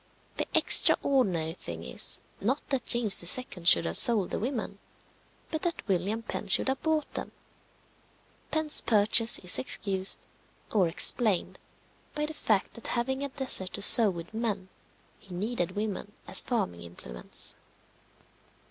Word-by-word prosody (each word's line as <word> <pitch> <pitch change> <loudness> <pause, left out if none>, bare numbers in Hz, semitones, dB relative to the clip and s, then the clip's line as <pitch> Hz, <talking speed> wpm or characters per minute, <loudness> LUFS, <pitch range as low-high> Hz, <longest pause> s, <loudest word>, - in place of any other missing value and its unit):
The - - -4
extraordinary 180 - +3
thing 85 - -10
is, - - -3 0.2
not 260 +8 -3
that 270 -3 -3
James 225 -7 0
II. 195 -9 -11
should 175 - +6
have - - -1
sold 215 -6 +5
the - - -4
women, 225 -4 -5 0.7
but 315 - -4
that 340 -8 -5
William 200 +4 -3
Penn 210 - -7
should 195 - +2
have 265 - -4
bought 315 -2 -3
them. - - -7 1.2
Penn's 315 -1 +1
purchase 225 +1 +3
is 180 -1 +1
excused, 195 -6 0 0.5
or 195 -5 +1
explained, 200 +3 +3 0.6
by 300 0 -3
the 310 - -7
fact 215 -9 -2
that 235 - -9
having 265 +3 -3
a 280 - -4
desert 255 -9 -2
to - - +2
sow 220 0 +8
with 170 +2 -9
men, 210 -4 -4 0.5
he 185 -3 -13
needed 200 -2 -4
women 205 0 -6
as - - +3
farming 150 - -4
implements. 75 -8 -5
215 Hz, 140 wpm, -26 LUFS, 185-255 Hz, 1.2 s, sow